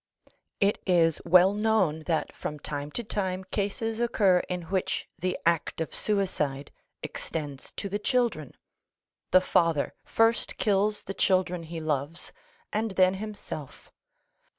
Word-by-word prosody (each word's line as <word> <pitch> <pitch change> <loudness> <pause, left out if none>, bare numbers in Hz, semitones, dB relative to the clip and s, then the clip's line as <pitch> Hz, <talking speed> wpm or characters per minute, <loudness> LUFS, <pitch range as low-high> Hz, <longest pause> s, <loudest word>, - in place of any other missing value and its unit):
It 200 0 +2
is 165 -3 +3
well 180 +3 +6
known 210 -7 +2
that 165 -3 0
from 150 - -5
time 145 0 -4
to 240 - -3
time 190 -3 -2
cases 210 +3 -2
occur 205 -6 +3
in 180 -1 -3
which 185 +2 -2
the 180 +2 -1
act 170 -1 +1
of 160 - -3
suicide 150 -9 -1 0.3
extends 145 -4 -5
to - - -4
the 205 +1 -2
children. 215 - 0 0.7
The 185 - +6
father 165 -5 +2
first 225 +1 +2
kills 210 0 +1
the 195 - -5
children 185 -3 +2
he 165 0 -6
loves, 155 +1 -3 0.4
and 220 +1 0
then 185 -1 +4
himself. 205 -9 -7
185 Hz, 130 wpm, -28 LUFS, 160-205 Hz, 0.7 s, well